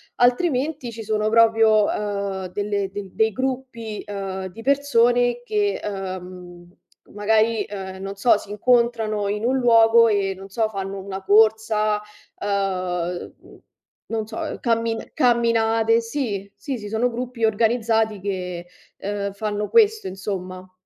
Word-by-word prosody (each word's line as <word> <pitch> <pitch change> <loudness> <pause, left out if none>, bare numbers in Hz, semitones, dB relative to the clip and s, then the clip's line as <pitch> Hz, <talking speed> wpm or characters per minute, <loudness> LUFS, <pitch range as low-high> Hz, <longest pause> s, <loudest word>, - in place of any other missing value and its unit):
altrimenti 260 +1 +1
ci 225 0 -7
sono 215 0 0
proprio, 225 -1 +5
uhm, 200 -2 -3
delle 205 -1 -1
del 195 -2 -7
dei 220 -1 +2
gruppi, 250 -4 -4
uhm, 195 -2 -4
di 205 +5 -11
persone 245 -3 +2
che, 210 -4 0
uhm, 185 -3 -7 0.5
magari, 215 +1 +2
ehm, 190 -2 -7
non 195 0 -5
so, 205 +2 +4
si 205 - -11
incontrano 225 -2 +1
in 210 +2 -2
un 260 +2 +2
luogo 230 -1 +6
e 200 -2 +1
non 195 +1 -11
so, 220 +2 0
fanno 195 -1 -5
una 195 0 -6
corsa, 215 0 +3 0.4
uhm, 185 -3 -2 0.7
non 220 -2 -3
so, 220 - -5
cammin 230 -1 -1
camminate, 230 -3 +3
sì, 230 -5 -3
sì, 275 -4 -5
sì, 210 -2 -8
sono 225 +3 +1
gruppi 245 0 -5
organizzati 220 -1 +1
che, 180 -3 -4 0.3
ehm, 200 0 -3
fanno 210 0 -3
questo 440 -1 +4
insomma. 185 -1 -6
215 Hz, 130 wpm, -22 LUFS, 195-230 Hz, 0.7 s, luogo